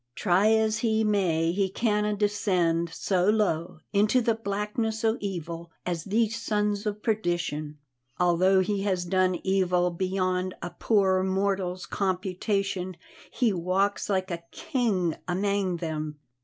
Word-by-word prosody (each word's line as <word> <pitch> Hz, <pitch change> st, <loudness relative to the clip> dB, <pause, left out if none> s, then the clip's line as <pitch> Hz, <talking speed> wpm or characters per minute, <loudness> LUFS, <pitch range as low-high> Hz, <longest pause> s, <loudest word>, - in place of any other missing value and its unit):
Try 185 Hz, +8 st, +3 dB
as 220 Hz, -1 st, +2 dB
he 220 Hz, -1 st, +1 dB
may, 175 Hz, -6 st, +2 dB
he 190 Hz, +1 st, 0 dB
canna 210 Hz, 0 st, 0 dB
descend 185 Hz, -5 st, +1 dB
so 185 Hz, +2 st, +1 dB
low 170 Hz, -7 st, 0 dB
into 210 Hz, +5 st, +4 dB
the 235 Hz, -1 st, +2 dB
blackness 220 Hz, +1 st, -2 dB
o' 220 Hz, 0 st, +3 dB
evil 170 Hz, -4 st, -5 dB, 0.2 s
as 170 Hz, -3 st, -3 dB
these 225 Hz, +2 st, 0 dB
sons 210 Hz, -1 st, 0 dB
o' 210 Hz, -, +1 dB
perdition. 175 Hz, -8 st, -2 dB, 0.4 s
Although 180 Hz, +2 st, +4 dB
he 195 Hz, +1 st, -1 dB
has 185 Hz, -3 st, 0 dB
done 185 Hz, 0 st, +1 dB
evil 180 Hz, -2 st, +2 dB
beyond 185 Hz, 0 st, -1 dB
a 175 Hz, -, -5 dB
poor 190 Hz, -4 st, +2 dB
mortal's 190 Hz, -1 st, -1 dB
computation, 190 Hz, -1 st, -2 dB, 0.3 s
he 235 Hz, -5 st, +1 dB
walks 190 Hz, +4 st, 0 dB
like 190 Hz, -1 st, 0 dB
a 170 Hz, -1 st, -4 dB
king 210 Hz, -, -1 dB
amang 190 Hz, 0 st, 0 dB
them. 155 Hz, -2 st, -4 dB
190 Hz, 130 wpm, -27 LUFS, 180-210 Hz, 0.4 s, into